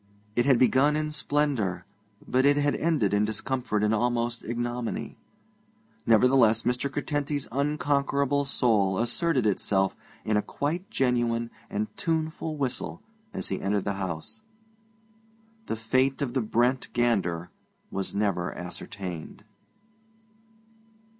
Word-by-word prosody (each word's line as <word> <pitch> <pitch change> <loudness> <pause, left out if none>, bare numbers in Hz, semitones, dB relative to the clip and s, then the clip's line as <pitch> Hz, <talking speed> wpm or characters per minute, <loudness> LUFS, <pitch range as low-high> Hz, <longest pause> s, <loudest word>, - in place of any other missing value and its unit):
It 120 +2 +2
had 135 -3 +6
begun 135 +4 +4
in 155 0 -1
splendour, 140 - 0 0.4
but 130 +1 +2
it 145 +1 +5
had 145 0 +2
ended 150 - +1
in 105 +1 +3
discomfort 110 0 -1
and 105 +1 +3
almost 120 +1 0
ignominy. 120 +1 -3 0.9
Nevertheless, 115 -1 +5
Mr. 125 +3 0
Curtenty's 145 0 -2
unconquerable 140 0 +1
soul 105 -8 +2
asserted 130 - +1
itself 95 -1 +1 0.3
in 110 -1 +2
a - - +3
quite 165 - -3
genuine 120 -2 +1 0.2
and 105 +1 -1
tuneful 160 -1 -2
whistle 135 -3 -3 0.3
as - - -3
he 95 - -2
entered 100 0 0
the 100 - 0
house. 90 - -5 1.3
The - - -1
fate 130 +4 +1
of 125 -3 -3
the 130 - +1
Brent 120 +4 +1
gander 95 -8 0 0.4
was 95 0 -3
never 100 -4 0
ascertained. 90 -1 -6
120 Hz, 120 wpm, -27 LUFS, 105-140 Hz, 1.3 s, had